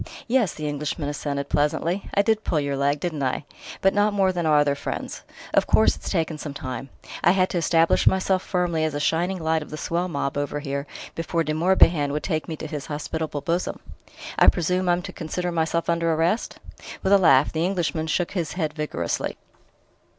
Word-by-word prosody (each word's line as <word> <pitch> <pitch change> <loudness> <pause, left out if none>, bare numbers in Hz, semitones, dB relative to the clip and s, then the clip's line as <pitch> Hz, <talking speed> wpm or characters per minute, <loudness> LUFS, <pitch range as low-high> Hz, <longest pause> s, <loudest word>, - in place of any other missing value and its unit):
"Yes," 235 -7 +2
the 155 -1 -4
Englishman 145 0 -3
assented 140 -1 -3
pleasantly; 165 +7 0
"I 200 - +4
did 220 0 +1
pull 155 - +1
your 140 -1 -1
leg 140 +1 +1
didn't 155 -3 -3
I? 135 +2 -1 0.4
But 195 - +4
not 205 0 +2
more 190 -2 +3
than 175 -3 -1
our 150 -1 +5
other 145 -1 +3
friends. 140 - -5 0.3
Of - - +3
course, - - +4
it's - - -7
taken 160 -1 -1
some 145 -2 -6
time: 135 -2 -5 0.3
I - - +6
had 185 -1 +2
to 175 - 0
establish 165 0 +3
myself 190 0 +3
firmly 175 -4 0
as 155 -2 -1
a - - -1
shining 170 +5 +1
light 160 -1 0
of 150 - -9
the 155 - -6
swell 170 +3 -1
mob 140 -4 -2
over 145 +1 -2
here 140 0 -4 0.3
before 165 0 -1
De 155 - -2
Morbihan 165 -3 +4
would 150 - -2
take 155 -4 -2
me 160 - -4
to 155 - -7
his 150 -2 -5
hospitable 150 0 -3
bosom." 170 +4 -1 0.6
"I - - +6
presume 180 +1 +2
I'm 175 0 +2
to - - -7
consider 175 +2 -3
myself 165 0 0
under 170 0 +1
arrest?" 165 +7 0 0.5
With 190 - +3
a 200 - +7
laugh, 145 -6 +5
the 160 0 0
Englishman 170 -3 -1
shook 170 +2 0
his 175 -5 -2
head 155 -4 -2
vigorously. 150 - -3
160 Hz, 200 wpm, -24 LUFS, 145-180 Hz, 0.6 s, a